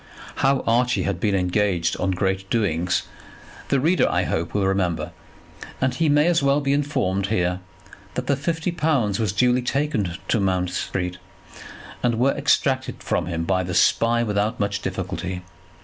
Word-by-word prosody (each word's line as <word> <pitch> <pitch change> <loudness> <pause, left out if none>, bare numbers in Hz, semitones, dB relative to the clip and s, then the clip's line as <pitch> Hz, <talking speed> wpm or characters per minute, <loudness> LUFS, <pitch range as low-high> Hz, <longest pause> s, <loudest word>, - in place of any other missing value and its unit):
How 135 0 +2
Archie 125 +2 +2
had 100 -3 -2
been 100 0 +1
engaged 90 -2 +1
on 95 - -1
great 95 +1 -1
doings, 90 -5 0 0.7
the 140 - +3
reader, 165 +7 +3
I - - +1
hope, 85 +1 -2
will 100 -2 +2
remember; 95 -3 0 0.7
and 130 -1 +1
he 155 +4 +1
may 145 +1 +4
as 175 -2 +3
well 140 +1 +3
be 140 -1 0
informed 130 -10 0
here 90 -3 0 0.6
that 125 - -2
the 140 - +2
fifty 165 +5 -2
pounds 140 - 0
were 110 - +1
duly 125 +6 +2
taken 125 - -1
to 115 - +2
Mount 90 -2 0
Street, 90 -1 -3 0.8
and 120 -2 +1
were 130 +4 +3
extracted 135 -2 0
from - - -1
him 85 -2 -2
by 95 +2 +1
the 90 -1 -4
Spy 115 +6 +3
without 105 +1 -1
much 100 0 -1
difficulty. 95 -1 -4
105 Hz, 165 wpm, -23 LUFS, 95-135 Hz, 0.8 s, may